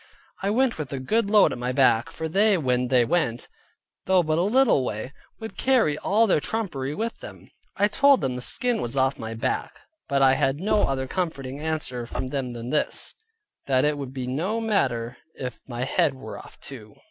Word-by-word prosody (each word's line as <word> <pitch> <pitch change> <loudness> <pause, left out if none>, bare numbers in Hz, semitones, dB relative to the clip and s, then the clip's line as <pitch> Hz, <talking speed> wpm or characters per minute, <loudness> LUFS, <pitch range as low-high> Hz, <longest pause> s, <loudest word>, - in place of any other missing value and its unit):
I 195 - 0
went 240 -1 +1
with 145 -4 -5
a 135 - -3
good 205 - 0
load 210 -1 +5
at - - -5
my 125 +1 -2
back 125 -3 +3
(for 160 - -5
they 200 +4 +3
when 125 -5 0
they 125 -1 +3
went, 120 -5 -1 0.6
though 185 -1 +4
but 155 0 0
a - - +3
little 220 - +3
way, 125 +3 -5 0.3
would 220 -1 -8
carry 250 - +3
all 210 +8 +2
their 190 - +3
trumpery 150 -9 -3
with 230 +6 -4
them). - - -12 0.3
I 205 - +4
told 280 +5 +4
them 130 -2 -1
the 125 - -5
skin 240 - +3
was 120 +3 -3
off 135 +1 +1
my 110 0 -5
back, 130 +3 -3 0.3
but 140 -1 +2
I 130 0 +6
had 135 +1 0
no 210 +2 +2
other 130 -1 -1
comforting 140 -4 -4
answer 150 -6 -3
from 130 +2 -4
them 130 -3 -3
than 120 +1 -6
this: 150 - 0 0.5
that 130 -1 +3
it 150 0 +1
would 140 -3 -6
be 130 -2 -5
no 170 - -2
matter 120 - -1 0.2
if 125 -2 -6
my 120 -1 -4
head 135 +1 +1
were 130 - -9
off - - -14
too. 115 -6 -11
140 Hz, 205 wpm, -25 LUFS, 130-200 Hz, 0.6 s, I